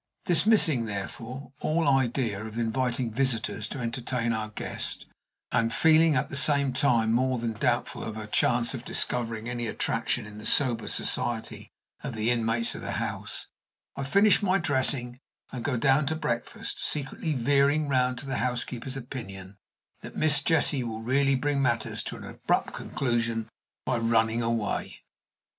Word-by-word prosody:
Dismissing, 170 - +5
therefore, 115 +6 -6
all 160 0 0
idea 125 -6 +1
of 110 +1 -8
inviting 120 +1 -1
visitors 115 -4 0
to 140 - -6
entertain 120 -1 -2
our 110 -1 -3
guest, 105 - -3 0.5
and 115 -2 +1
feeling, 160 +2 +4
at 130 +2 0
the 140 - -7
same 140 -1 +4
time, 120 -5 +2
more 130 +1 +1
than 115 -1 -2
doubtful 105 - -1
of 110 - -5
her 110 -1 -6
chance 120 +3 +2
of 125 -3 -6
discovering 115 -3 -1
any 120 -1 -3
attraction 105 - -1
in 105 0 -10
the 105 - -10
sober 120 -5 +2
society 115 -2 -2 0.3
of 125 - -5
the 110 +2 0
inmates 115 0 +1
of - - -8
the - - -4
house, - - -4 0.5
I 140 - -4
finish 200 +9 +4
my 195 -1 +2
dressing 130 -6 0 0.3
and 125 -3 -6
go 140 -4 -1
down 135 +3 +3
to 160 - 0
breakfast, 120 -6 -4
secretly 150 +2 -2
veering 140 +3 +2
round 125 -2 +1
to 140 - -5
the 135 -1 -3
housekeeper's 125 +1 -3
opinion 100 -7 -8 0.4
that - - -10
Miss 155 -1 +4
Jessie 145 -5 +2
will 110 -1 -5
really 135 +3 +2
bring 140 +1 0
matters 115 -4 0
to - - -5
an - - -10
abrupt - - -2
conclusion 115 -3 -2 0.4
by 120 - 0
running 115 0 +2
away. 115 -2 -2
125 Hz, 155 wpm, -27 LUFS, 115-140 Hz, 0.5 s, Dismissing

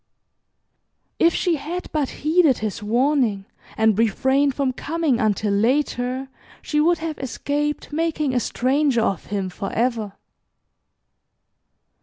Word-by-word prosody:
If 335 0 +4
she 345 -3 +1
had 335 +6 -6
but 295 -4 0
heeded 310 -3 +2
his 215 0 -4
warning, 235 -2 +1 0.3
and 220 -1 +3
refrained 265 +5 +2
from 270 -2 0
coming 300 -3 -1
until 210 -1 +1
later, 250 +3 0 0.4
she 300 -1 +1
would 340 +2 +3
have 320 -1 -5
escaped 290 +3 -3
making 305 -3 0
a 250 - +2
stranger 260 +1 +1
of 195 -6 -1
him 200 -2 -2
forever. 220 +1 -2
265 Hz, 115 wpm, -22 LUFS, 225-300 Hz, 0.4 s, If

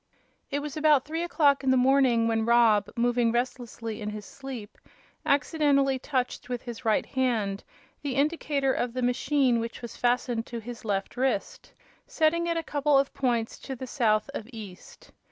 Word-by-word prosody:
It 285 0 -2
was 295 -2 -5
about 300 -3 +4
three 320 +3 -3
o'clock 300 -5 +2
in 265 - +1
the 260 - +4
morning 255 -3 +4
when 225 -1 +1
Rob, 225 -3 +4
moving 240 0 +2
restlessly 240 -2 -3
in 210 - -3
his 210 -1 -7
sleep, 260 -6 -9 0.5
accidently 280 -2 +2
touched 255 -2 -2
with 245 -1 -3
his 240 0 -8
right 220 -2 +2
hand 225 -7 -1 0.4
the 280 -3 -3
indicator 280 -2 +1
of 245 -1 -2
the 255 0 -2
machine 250 0 +2
which 230 +1 -5
was 235 - -7
fastened 240 -1 0
to 235 - -6
his 235 +1 -8
left 200 +1 -2
wrist, 255 -6 -2 0.4
setting 335 +2 +1
it 335 -1 0
a 330 - -1
couple 290 -1 +2
of 275 0 +1
points 235 -4 -1
to 265 - -6
the 260 - -6
south 225 -5 +1
of 225 - -6
east. 205 -6 -11
250 Hz, 170 wpm, -27 LUFS, 230-280 Hz, 0.5 s, about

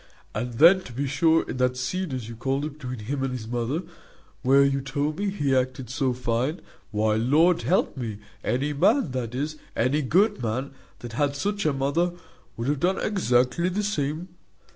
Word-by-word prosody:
And 120 +3 -3
then, 170 +8 +7
to 125 - -9
be 140 +4 -2
sure, 160 +4 +2
in - - -4
that 125 0 +1
scene, 175 +7 -2
as 125 -4 -4
you 115 - -7
called 135 +5 -1
it, 150 0 -7
between 125 -6 -6
him 135 +3 -2
and 135 -1 -1
his 120 -4 -5
mother, 120 +8 -2 0.6
where 135 +2 +5
you 140 0 +1
told 145 +4 -2
me 205 0 0
he 145 -9 0
acted 130 -1 -1
so 130 -1 +1
fine, 125 +5 -1 0.3
why, 110 0 +1
Lord 160 +9 +4
help 185 - +1
me, 115 -6 -4 0.3
any 135 +6 0
man, 185 - +3
that 125 -2 -3
is, 150 +3 -2 0.2
any 130 +6 +2
good 190 - +2
man, 125 +4 -2 0.3
that 120 -1 -7
had 140 +3 0
such 200 +4 -1
a - - +3
mother, 140 +6 0 0.4
would 115 +2 -3
have 145 -1 +1
done 185 +5 +2
exactly 150 - +2
the 200 +3 -1
same. 160 -3 -2
135 Hz, 190 wpm, -25 LUFS, 125-160 Hz, 0.6 s, then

